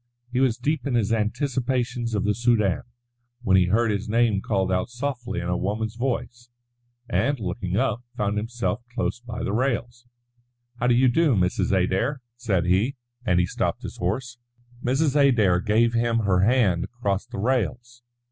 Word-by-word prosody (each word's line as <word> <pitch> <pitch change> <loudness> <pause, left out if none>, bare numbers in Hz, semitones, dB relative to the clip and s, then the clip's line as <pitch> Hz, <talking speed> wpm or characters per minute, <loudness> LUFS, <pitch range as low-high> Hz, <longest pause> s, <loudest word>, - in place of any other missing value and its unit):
He 125 - +1
was 130 -4 +2
deep 150 0 -1
in 130 - 0
his 115 -1 +1
anticipations 120 0 -1
of 105 - 0
the 105 - +2
Soudan, 110 -5 +2 0.6
when 95 -4 +3
he 95 -1 +5
heard 110 +5 +2
his 105 +1 -3
name 115 -3 +2
called 95 -3 0
out 90 +3 0
softly 125 -3 -4
in 85 - -4
a 90 +1 0
woman's 105 +4 -2
voice, 120 0 -3 0.6
and, 140 -1 0
looking 95 -1 -3
up, 125 -2 0
found 105 -3 0
himself 120 +3 -2
close 120 - -1
by 120 -3 -6
the 100 - -2
rails. 120 0 -2 0.7
"How 125 - +1
do 120 - +4
you 130 +2 +4
do, 145 +1 +3
Mrs. 90 -2 +1
Adair?" 95 +9 +1
said 100 -8 0
he, 95 +9 +2 0.3
and 90 -2 +3
he 90 - +3
stopped - - -2
his - - -7
horse. 120 +7 -3 0.4
Mrs. 135 +3 +1
Adair 115 -11 +4
gave 115 +4 +2
him 115 0 +1
her 95 -4 +2
hand 100 -5 +3
across 110 -2 -3
the 120 - -8
rails. 120 +1 -1
115 Hz, 170 wpm, -24 LUFS, 100-125 Hz, 0.7 s, he